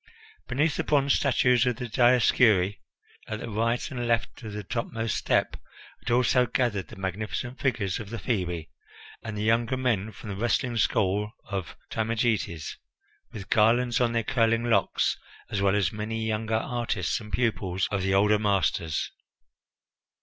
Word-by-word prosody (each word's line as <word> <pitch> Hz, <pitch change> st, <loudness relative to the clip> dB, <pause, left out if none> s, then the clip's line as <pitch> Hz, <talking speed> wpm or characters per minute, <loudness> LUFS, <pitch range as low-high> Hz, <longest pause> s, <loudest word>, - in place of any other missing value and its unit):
Beneath 145 Hz, +4 st, +1 dB
the -, -, 0 dB
bronze 140 Hz, -2 st, +3 dB
statues 125 Hz, -2 st, +3 dB
of 125 Hz, -, +1 dB
the 125 Hz, -, -5 dB
Dioscuri, 115 Hz, -5 st, +4 dB, 0.5 s
at 110 Hz, 0 st, -4 dB
the 115 Hz, -, -6 dB
right 115 Hz, +6 st, 0 dB
and 120 Hz, -3 st, -3 dB
left 115 Hz, +1 st, -1 dB
of 110 Hz, -3 st, -7 dB
the 105 Hz, 0 st, -5 dB
topmost 115 Hz, +2 st, -2 dB
step, -, -, +1 dB, 0.4 s
had -, -, -6 dB
also 125 Hz, +1 st, +3 dB
gathered 115 Hz, -6 st, 0 dB
the -, -, -11 dB
magnificent 105 Hz, +7 st, -4 dB
figures 120 Hz, -8 st, 0 dB
of 110 Hz, -3 st, -7 dB
the 115 Hz, -, -5 dB
Phebi 90 Hz, -8 st, -2 dB, 0.5 s
and 110 Hz, -2 st, -6 dB
the 105 Hz, -, -2 dB
younger 115 Hz, +3 st, +2 dB
men 115 Hz, -5 st, 0 dB
from 105 Hz, +1 st, -9 dB
the -, -, -4 dB
wrestling 120 Hz, +3 st, 0 dB
school 105 Hz, 0 st, +1 dB
of 95 Hz, -4 st, -5 dB
Timagetes, 110 Hz, -7 st, -1 dB, 0.5 s
with 105 Hz, -1 st, -9 dB
garlands 120 Hz, +3 st, +3 dB
on 120 Hz, -1 st, +2 dB
their 115 Hz, -1 st, +1 dB
curling 115 Hz, 0 st, +2 dB
locks, 100 Hz, -3 st, +2 dB, 0.3 s
as 100 Hz, -, -1 dB
well 100 Hz, 0 st, +3 dB
as 105 Hz, -2 st, +1 dB
many 110 Hz, +1 st, -3 dB
younger 110 Hz, 0 st, -1 dB
artists 115 Hz, -5 st, -1 dB
and 105 Hz, -2 st, -11 dB
pupils 100 Hz, -6 st, 0 dB
of 100 Hz, -2 st, 0 dB
the 95 Hz, +1 st, +1 dB
older 105 Hz, +2 st, +4 dB
masters. 95 Hz, -6 st, 0 dB
110 Hz, 155 wpm, -27 LUFS, 100-120 Hz, 0.5 s, Dioscuri